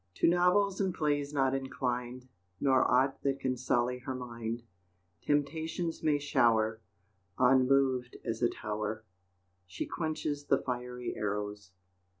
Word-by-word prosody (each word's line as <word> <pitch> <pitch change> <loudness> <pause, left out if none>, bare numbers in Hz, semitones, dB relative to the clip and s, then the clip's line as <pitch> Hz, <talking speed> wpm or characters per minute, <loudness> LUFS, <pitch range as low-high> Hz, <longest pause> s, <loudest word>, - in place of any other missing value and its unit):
To - - +3
novels 180 +3 +3
and 190 -2 0
plays 145 -2 0
not 135 -2 +2
inclined, 125 -2 -3 0.3
Nor 130 -2 +3
aught 130 +2 +2
that 135 -1 0
can 130 -1 -1
sully 125 0 0
her 130 +1 -5
mind; 115 -2 -5 0.6
Temptations 160 +3 -1
may 150 -2 +3
shower, 115 -6 +2 0.6
Unmoved 130 -1 +3
as 115 -1 -3
a 120 - +4
tower, 105 +1 -4 0.6
She 90 - -4
quenches 155 -3 -3
the - - +3
fiery 125 -1 -4
arrows. 105 -2 -4
130 Hz, 125 wpm, -31 LUFS, 120-145 Hz, 0.6 s, a